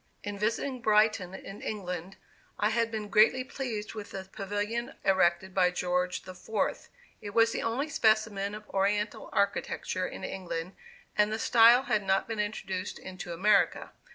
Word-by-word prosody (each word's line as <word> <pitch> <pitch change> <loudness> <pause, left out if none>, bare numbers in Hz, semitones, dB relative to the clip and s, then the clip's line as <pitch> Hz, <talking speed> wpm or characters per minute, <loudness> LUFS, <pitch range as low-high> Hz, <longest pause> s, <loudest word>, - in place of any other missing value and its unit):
In 205 -1 -5
visiting 235 +4 -1
Brighton, 210 -4 +3
in 195 +1 -9
England, 185 -3 -5 0.4
I 210 +1 +2
had 230 0 +1
been 215 -2 -4
greatly 225 +5 +4
pleased 240 -5 -5
with 215 -2 -7
the 190 - -6
Pavilion 205 +4 -3
erected 190 -1 +2
by 185 -1 +4
George 180 0 -1
IV. 185 +4 -3 0.3
It 205 -1 -8
was 230 0 +5
the - - -2
only 245 +6 -1
specimen 215 -6 +1
of 210 0 -10
Oriental 205 +2 0
architecture 200 0 -1
in - - -8
England, 180 -1 -4 0.4
and 210 0 +3
the 220 - -1
style 235 +2 +6
had 215 -5 +1
not 195 -1 +1
been 225 -2 -4
introduced 195 -3 -3
into 185 -2 -8
America. 200 +5 +2
210 Hz, 155 wpm, -29 LUFS, 190-220 Hz, 0.4 s, style